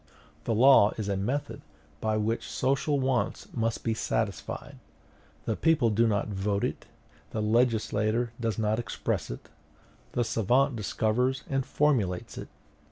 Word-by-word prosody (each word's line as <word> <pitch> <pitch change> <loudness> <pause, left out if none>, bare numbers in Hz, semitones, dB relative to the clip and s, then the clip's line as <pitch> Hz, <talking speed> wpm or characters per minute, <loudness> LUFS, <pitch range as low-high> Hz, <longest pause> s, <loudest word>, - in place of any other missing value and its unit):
The 115 - 0
law 120 -3 +6
is 110 -3 -3
a 100 - 0
method 135 +9 -2 0.4
by 110 -1 0
which 110 +2 -1
social 140 +2 0
wants 130 -1 -1
must 115 -1 -1
be 115 - 0
satisfied; 110 -2 -3 0.7
the - - 0
people 155 -9 +3
do 115 +3 +3
not 105 -2 0
vote 100 0 -1
it, - - -3 0.4
the 110 - -4
legislator 110 0 +1
does 115 -3 -1
not 110 0 +1
express 120 - -3
it: - - -8 0.7
the 120 - +1
savant 120 +4 +2
discovers 115 +4 0
and 135 0 +1
formulates 120 -13 0
it." - - -7
115 Hz, 140 wpm, -28 LUFS, 105-130 Hz, 0.7 s, law